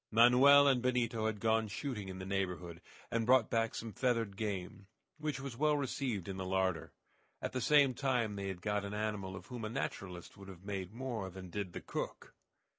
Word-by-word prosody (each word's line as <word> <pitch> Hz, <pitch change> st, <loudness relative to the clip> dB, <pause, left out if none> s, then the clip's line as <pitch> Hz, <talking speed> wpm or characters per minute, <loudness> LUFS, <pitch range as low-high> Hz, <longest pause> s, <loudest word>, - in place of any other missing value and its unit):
Manoel 125 Hz, +5 st, +7 dB
and 130 Hz, -3 st, +4 dB
Benito 120 Hz, -3 st, +1 dB
had 105 Hz, -2 st, -2 dB
gone 110 Hz, 0 st, +2 dB
shooting 105 Hz, -2 st, -4 dB
in 95 Hz, -, -6 dB
the 95 Hz, -, -6 dB
neighborhood, 90 Hz, -3 st, -3 dB, 0.3 s
and 115 Hz, -1 st, +1 dB
brought 125 Hz, -1 st, +4 dB
back 115 Hz, -1 st, +1 dB
some 115 Hz, -2 st, -5 dB
feathered 115 Hz, -5 st, 0 dB
game, 100 Hz, -1 st, -4 dB, 0.3 s
which 150 Hz, -4 st, -2 dB
was 135 Hz, -3 st, -6 dB
well 150 Hz, +3 st, +2 dB
received 130 Hz, -, -2 dB
in 95 Hz, -1 st, -4 dB
the 95 Hz, -, -3 dB
larder. 95 Hz, -1 st, 0 dB, 0.5 s
At -, -, -3 dB
the 130 Hz, -, -2 dB
same 145 Hz, -2 st, +5 dB
time 125 Hz, -5 st, 0 dB
they 100 Hz, -1 st, -4 dB
had 95 Hz, -2 st, -5 dB
got 105 Hz, -1 st, 0 dB
an 100 Hz, +1 st, -4 dB
animal 105 Hz, -3 st, -2 dB
of 90 Hz, -1 st, -9 dB
whom 120 Hz, -2 st, -7 dB
a 110 Hz, -, -2 dB
naturalist 90 Hz, -5 st, -5 dB
would 100 Hz, -1 st, -11 dB
have 95 Hz, -1 st, -11 dB
made 95 Hz, -2 st, -4 dB
more 115 Hz, -5 st, -4 dB
than 95 Hz, -1 st, -9 dB
did 100 Hz, -3 st, -4 dB
the -, -, -5 dB
cook. -, -, -5 dB
110 Hz, 200 wpm, -34 LUFS, 95-125 Hz, 0.5 s, Manoel